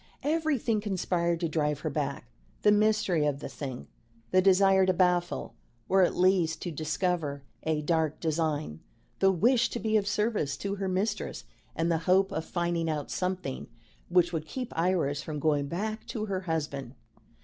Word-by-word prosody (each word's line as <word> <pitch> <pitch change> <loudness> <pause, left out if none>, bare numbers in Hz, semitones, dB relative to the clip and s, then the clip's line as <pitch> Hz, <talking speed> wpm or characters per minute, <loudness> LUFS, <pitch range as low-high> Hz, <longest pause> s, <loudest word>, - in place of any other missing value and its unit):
Everything 290 -8 +1
conspired 175 -4 0
to 170 - +1
drive 150 -2 -1
her 155 - -1
back: 140 -3 -3 0.4
the 210 - +6
mystery 210 -6 +3
of 145 -2 0
the - - -6
thing; 130 -4 -7 0.4
the 185 - +5
desire 195 0 +5
to 185 0 +3
baffle, 175 -3 +1 0.3
or 190 0 +4
at 180 - +3
least 180 -3 +3
to 175 - -3
discover, 155 -2 -2 0.2
a 155 -1 -1
dark 160 -1 0
design; 155 - -1 0.4
the 195 - +5
wish 235 +6 +3
to 240 - -4
be 220 -1 +2
of 205 -1 -1
service 205 -9 0
to 200 +5 -3
her 195 0 -2
mistress; 200 +3 -2 0.3
and 165 +1 0
the 165 - +2
hope 190 +1 +4
of 160 - -2
finding 170 -2 -1
out 150 -2 -3
something 180 -7 -3 0.4
which 175 0 +3
would 160 -1 -3
keep 250 +4 -5
Iris 165 -5 +1
from 155 -1 -5
going 145 -1 +1
back 215 +8 -4
to 215 -2 -3
her 195 -3 -2
husband. 145 -7 -3
175 Hz, 170 wpm, -29 LUFS, 155-195 Hz, 0.4 s, the